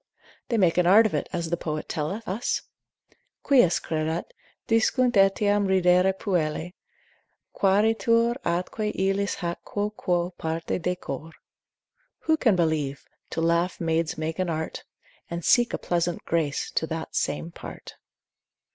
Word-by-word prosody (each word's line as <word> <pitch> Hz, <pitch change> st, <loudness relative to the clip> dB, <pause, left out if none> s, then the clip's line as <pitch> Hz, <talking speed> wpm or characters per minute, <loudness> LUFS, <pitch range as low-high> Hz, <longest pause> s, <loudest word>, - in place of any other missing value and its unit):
They 235 Hz, -, +1 dB
make 180 Hz, -4 st, +3 dB
an 175 Hz, -, +3 dB
art 210 Hz, +5 st, +7 dB
of 215 Hz, -, 0 dB
it, -, -, -2 dB
as 170 Hz, -2 st, -3 dB
the 170 Hz, -, +1 dB
poet 155 Hz, -2 st, -4 dB
telleth 175 Hz, +9 st, -3 dB
us, 205 Hz, +6 st, -1 dB, 0.8 s
Quis 245 Hz, -, +4 dB
credat? 160 Hz, +1 st, -3 dB, 0.3 s
discunt 240 Hz, +3 st, +3 dB
etiam 205 Hz, +1 st, +3 dB
ridere 185 Hz, 0 st, +4 dB
puellae, 180 Hz, -3 st, -2 dB, 0.8 s
Quaeritur 225 Hz, +4 st, +3 dB
atque 180 Hz, +5 st, -1 dB
illis 195 Hz, +1 st, 0 dB
hac 170 Hz, 0 st, -3 dB
quoque 180 Hz, -4 st, -2 dB
parte 165 Hz, +2 st, -2 dB
decor. 165 Hz, -3 st, -4 dB, 0.9 s
Who 320 Hz, -, +3 dB
can 230 Hz, -10 st, +3 dB
believe? 155 Hz, -5 st, -1 dB, 0.2 s
to 165 Hz, -, -3 dB
laugh 170 Hz, +2 st, +1 dB
maids 165 Hz, -1 st, 0 dB
make 160 Hz, +2 st, -3 dB
an 185 Hz, -1 st, 0 dB
art, 160 Hz, -1 st, -4 dB, 0.4 s
And 170 Hz, -1 st, -5 dB
seek 240 Hz, -1 st, +4 dB
a -, -, -1 dB
pleasant 175 Hz, 0 st, -1 dB
grace 155 Hz, -4 st, -1 dB
to -, -, -1 dB
that -, -, -5 dB
same 75 Hz, +3 st, -1 dB
part. -, -, -10 dB
180 Hz, 135 wpm, -26 LUFS, 165-205 Hz, 0.9 s, art